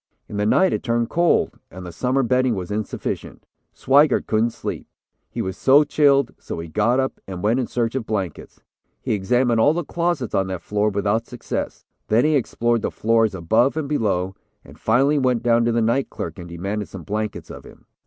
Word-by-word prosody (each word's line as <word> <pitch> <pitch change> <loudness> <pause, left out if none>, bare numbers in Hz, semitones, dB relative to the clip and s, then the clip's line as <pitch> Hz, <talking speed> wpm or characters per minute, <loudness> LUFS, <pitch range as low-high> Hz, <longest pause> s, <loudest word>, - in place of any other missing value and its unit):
In 105 - -6
the 105 0 +1
night, 190 +10 +3
it - - -1
turned 115 -1 -1
cold, 170 +1 +2
and 90 0 -10
the 90 - -7
summer 130 +10 0
bedding 125 0 +2
was 95 +1 -5
insufficient. 105 0 -4 0.3
Swigert 140 +1 +3
couldn't 110 +2 +1
sleep, - - -6 0.4
he - - -4
was 95 0 -4
so 140 +6 +5
chilled, 140 -2 +3
so - - -6
he 85 0 -6
got 110 +9 +1
up, 130 0 -2
and 95 -1 -6
went 115 +5 +2
in 125 - -1
search 115 -2 -1
of 130 -4 -3
blankets. 95 -7 -4 0.4
He - - -2
examined 120 +4 +1
all 145 +7 +5
the 175 +1 -2
closets 170 -8 -2
on 95 -1 +1
that 95 -2 -5
floor, 105 +1 0
without 105 +3 -1
success; 125 - -5 0.2
then 115 +6 +3
he 155 0 +3
explored 120 -3 0
the - - -1
floors 115 -2 +1
above 110 - +2
and 155 -3 -2
below, 95 -10 0 0.3
and - - -15
finally 135 +6 +3
went 125 -3 +1
down 115 -1 +3
to 120 - +2
the 115 0 +1
night 120 +4 +1
clerk, 80 +1 -6
and 85 -1 -9
demanded 100 +5 -4
some 95 -3 -9
blankets 105 +4 -4
of - - -10
him. - - -16
115 Hz, 205 wpm, -22 LUFS, 100-130 Hz, 0.4 s, so